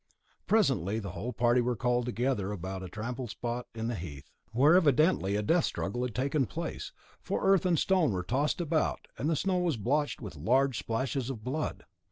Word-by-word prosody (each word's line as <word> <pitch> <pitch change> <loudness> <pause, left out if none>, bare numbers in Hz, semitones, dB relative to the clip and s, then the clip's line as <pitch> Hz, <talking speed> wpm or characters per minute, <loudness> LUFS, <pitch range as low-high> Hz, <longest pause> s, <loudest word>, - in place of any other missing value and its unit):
Presently 125 - +2
the 100 -4 -4
whole 115 +6 -4
party 120 +1 +3
were 120 0 0
called 125 +1 0
together 120 -5 -1
about 95 -1 -5
a 95 - -7
trampled 120 +5 -5
spot 120 +2 -4
in 110 0 -3
the 120 - -1
heath, 75 - -8 0.2
where 135 +8 +5
evidently 155 - +4
a 105 - 0
death 165 +10 +3
struggle 100 +6 -3
had 125 -3 -3
taken 135 0 +1
place, - - -5 0.3
for - - -2
earth 195 -2 +4
and 175 -2 +3
stone 180 - +3
were 90 -2 -2
tossed 135 - 0
about, 160 -2 0
and 145 - 0
the 165 - +2
snow 185 +4 +1
was 170 -7 0
blotched 145 +8 0
with 105 -9 -8
large 125 - +2
splashes 120 +4 -2
of 115 -5 -6
blood. 150 +5 -3
125 Hz, 195 wpm, -30 LUFS, 105-145 Hz, 0.3 s, where